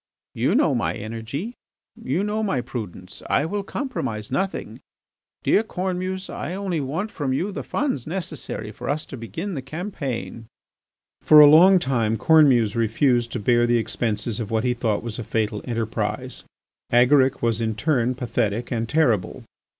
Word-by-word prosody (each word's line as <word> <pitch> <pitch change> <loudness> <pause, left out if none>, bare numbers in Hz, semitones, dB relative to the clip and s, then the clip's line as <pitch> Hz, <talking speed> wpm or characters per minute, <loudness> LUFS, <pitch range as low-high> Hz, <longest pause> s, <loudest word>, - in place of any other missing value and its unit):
"You - - +1
know - - +3
my - - -1
energy; 115 - -5 0.4
you 155 +9 -2
know 210 +1 -1
my 195 -12 0
prudence. 105 -7 -7
I 145 - +2
will 205 +5 -2
compromise 130 - -4
nothing.... 195 0 -3 0.6
Dear - - +4
Cornemuse, 185 -2 -3
I 170 +6 -5
only 190 -5 -2
want 160 +11 -3
from 135 -4 -2
you 180 +10 -1
the - - -5
funds 265 - -2
necessary 155 - -5
for - - -7
us 150 +2 -1
to - - -8
begin 115 - -5
the 140 - -4
campaign." 135 - -5 0.7
For 155 - +7
a 150 - +11
long 175 +6 +8
time 115 -8 0
Cornemuse 130 -7 +4
refused 115 +1 +1
to 125 - -2
bear 120 +2 +3
the 120 0 +3
expenses 110 -1 -2
of 110 -3 -4
what 110 0 0
he 125 -1 +1
thought 115 -3 -1
was 115 0 -5
a - - -3
fatal 105 -1 -1
enterprise. 115 -3 -3 0.5
Agaric 130 +2 +4
was 115 -1 +1
in 110 -1 -1
turn 125 0 +1
pathetic 120 -2 -2
and 115 -2 -2
terrible. 120 - +1
125 Hz, 160 wpm, -23 LUFS, 115-165 Hz, 0.7 s, a